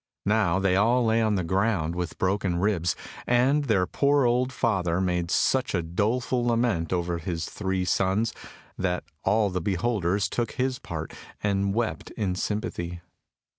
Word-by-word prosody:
Now 105 -4 +2
they 95 -1 +2
all 120 +5 +3
lay 115 +1 +3
on 110 -2 +2
the 95 - 0
ground 95 -2 0
with 90 -1 -4
broken 95 -2 0
ribs, 90 -4 +1 0.3
and 130 +4 +3
their 100 -7 +2
poor 140 +7 +2
old 125 +2 +2
father 95 -8 0
made 90 -2 0
such 130 +2 +2
a 85 - 0
doleful 115 +8 0
lament 115 -8 +1
over 85 -1 -1
his 85 0 -3
three 95 -2 -2
sons 100 +5 +1 0.5
that 90 -1 -1 0.2
all 105 -2 +2
the 90 0 -2
beholders 100 0 0
took 120 +3 -2
his 130 -1 -1
part 80 -2 -6 0.3
and 100 -1 +1
wept 115 -1 -2
in 100 -4 0
sympathy. 90 -3 -3
100 Hz, 155 wpm, -26 LUFS, 90-115 Hz, 0.5 s, all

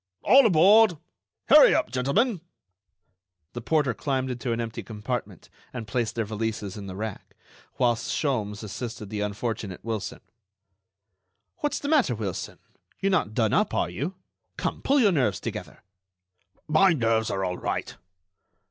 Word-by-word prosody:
"All 265 -2 +7
aboard. 195 +1 +6 0.5
Hurry - - +8
up, - - 0
gentlemen!" 160 - +1 1.1
The 120 - -5
porter 145 0 +1
climbed 130 -2 -2
into 125 0 -3
an 115 - -1
empty 115 -1 -4
compartment 105 -3 -5 0.3
and 115 -3 -6
placed 115 -1 -2
their 115 -2 -1
valises 105 -2 -4
in 100 -2 -8
the 95 - -7
rack, 110 0 -6 0.4
whilst 120 -3 +1
Sholmes 110 -8 -2
assisted 110 0 -6
the 105 -1 -3
unfortunate 105 -2 -4
Wilson. 110 -3 -4 1.4
"What's 295 - -1
the 285 - -5
matter, 285 - +3
Wilson? 105 -5 -5 0.4
You're 195 - +1
not 135 - 0
done 110 -3 +1
up, - - +1
are 85 - 0
you? 145 - -4 0.4
Come, - - -3
pull 280 +1 +3
your 215 -6 +5
nerves 130 - +1
together." - - -7 0.8
"My 180 +4 +5
nerves 115 -5 +1
are 95 -1 -1
all 90 0 -3
right." - - -3
115 Hz, 145 wpm, -26 LUFS, 105-155 Hz, 1.4 s, Hurry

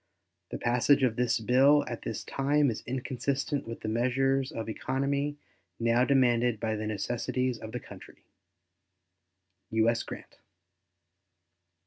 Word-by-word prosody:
The - - -4
passage 125 +4 +3
of 120 -3 +2
this 120 -2 +1
bill 135 +6 +4
at 120 - -5
this 110 - -5
time 140 0 +1
is 110 - -6
inconsistent 135 +2 -2
with 115 - -7
the - - -5
measures 135 +4 +1
of 115 -7 -5
economy 140 +5 -1 0.4
now 115 +2 +3
demanded 120 -4 +3
by 110 -1 -1
the 105 0 -4
necessities 120 +4 -2
of 110 - -8
the - - -4
country. - - -14 1.5
U.S. 115 +1 +2
GRANT. - - -9
125 Hz, 125 wpm, -29 LUFS, 115-135 Hz, 1.5 s, bill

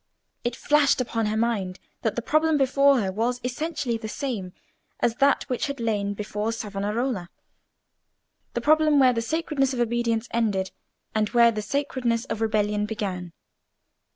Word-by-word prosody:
It 240 0 -1
flashed 295 0 +3
upon 230 -3 -1
her 215 +1 -1
mind 210 -5 -1 0.2
that 225 - -1
the 240 - -2
problem 310 +2 +2
before 275 0 +4
her 190 -2 -1
was 235 +5 -1
essentially 255 -1 -2
the 220 -1 -6
same 215 -9 -4 0.5
as 235 0 +1
that 280 +1 +3
which 250 +2 -2
had 280 -2 -5
lain 205 -3 -1
before 210 +1 -2
Savonarola—the 210 -1 -2 1.3
problem 310 -1 +4
where 260 -2 +6
the 230 - -1
sacredness 275 -1 0
of - - -4
obedience 235 -1 0
ended, 205 -5 0 0.4
and 215 -1 +1
where 235 -1 +5
the 215 -1 -3
sacredness 245 -1 -1
of 225 -3 -4
rebellion 210 -1 +1
began. 190 -5 -4
230 Hz, 150 wpm, -25 LUFS, 210-270 Hz, 1.3 s, where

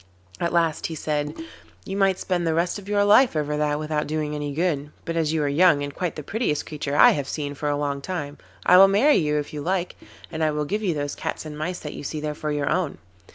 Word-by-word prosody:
At 170 - 0
last 165 -3 +1
he 160 - -6
said: 150 -1 -2 0.5
'You 195 - -4
might 195 -2 +2
spend 175 -2 -1
the 160 - +1
rest 175 +4 0
of 200 0 -11
your 205 -1 +3
life 225 +1 +5
over 150 -1 -1
that 150 -1 0
without 150 0 -2
doing 150 0 -2
any 145 -1 -3
good, 150 -2 -1 0.2
but 165 - -3
as 160 -2 +1
you 160 -2 0
are - - +1
young, 150 0 +4
and 145 0 -5
quite 180 -4 -3
the 150 - -6
prettiest 175 - -1
creature 145 -2 -4
I - - +8
have 140 -2 -2
seen 145 -2 -3
for 145 +1 -3
a 145 - 0
long 140 -1 -2
time, 145 -3 -5 0.3
I 180 - +7
will 195 +1 +9
marry 225 +10 +4
you 150 -1 +1
if 145 0 -4
you 150 - -4
like, 180 +3 -1 0.4
and 160 -1 -2
I 155 - +3
will 150 0 -1
give 210 +8 -2
you 185 -6 0
those 145 -1 -3
cats - - -5
and 150 -1 -7
mice 175 +4 -3
that 150 - -6
you - - -7
see 155 +2 -4
there 150 0 -3
for 150 0 -4
your 145 -1 -1
own. 170 -4 -1
155 Hz, 260 wpm, -24 LUFS, 145-180 Hz, 0.5 s, will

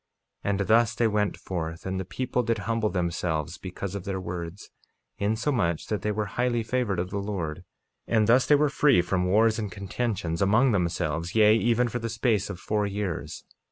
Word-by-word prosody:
48:20 - - -1
And 100 - -1
thus 115 0 +4
they 115 - +2
went 105 -1 0
forth, 85 -3 -5
and 95 0 -2
the 95 - -4
people 125 +5 -1
did 115 -1 0
humble 115 -1 0
themselves 85 -2 -2
because 95 +1 -6
of 100 -2 -5
their 95 -1 -3
words, 90 +1 -6 0.5
insomuch 105 - 0
that 105 - -1
they 105 - 0
were 105 0 -1
highly 120 +3 0
favored 115 -4 -1
of 90 +2 -2
the 100 - -2
Lord, 90 -5 -4 0.4
and 110 -2 +3
thus 120 +4 +4
they 150 - +6
were 150 +1 +3
free 140 -9 +4
from 90 0 0
wars 110 +4 +3
and 105 -3 -3
contentions 95 -3 -3
among 110 +7 +4
themselves, 85 -3 -1
yea, 110 -1 +6
even 120 +2 +2
for 120 +1 -3
the 115 0 -3
space 110 -2 0
of 95 -3 -6
four 105 0 0
years. 100 -3 -4
105 Hz, 195 wpm, -26 LUFS, 90-115 Hz, 0.5 s, they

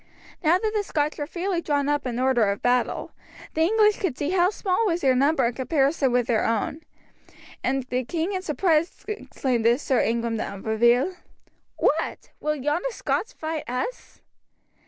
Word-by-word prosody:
Now 330 +3 +5
that 430 +3 -2
the 420 - +2
Scotch 300 -6 -1
were 290 - -3
fairly 355 +1 -2
drawn 285 -3 0
up 290 -2 0
in 240 -1 -3
order 255 -3 +3
of 200 - -3
battle, 245 0 +1 0.4
the 320 - 0
English 425 +4 +4
could 335 -10 -2
see 295 +3 -1
how 365 -1 +4
small 395 0 0
was 345 -2 0
their 265 -2 +4
number 275 0 +3
in 235 - 0
comparison 275 +1 +1
with 245 -1 +2
their 230 -3 +1
own, 230 +7 -1 0.8
and 265 +1 0
the 255 0 -2
king 330 - -2
in 375 - -2
surprise 335 -1 0
exclaimed 260 - -2
to 235 +1 +5
Sir 265 -3 +1
Ingram 230 0 0
de - - -1
Umfraville: 235 - +1 0.6
"What! - - 0
will 300 0 -1
yonder 295 - -1
Scots 460 - -2
fight 315 -4 -5
us?" 255 - -5
290 Hz, 175 wpm, -25 LUFS, 250-350 Hz, 0.8 s, Now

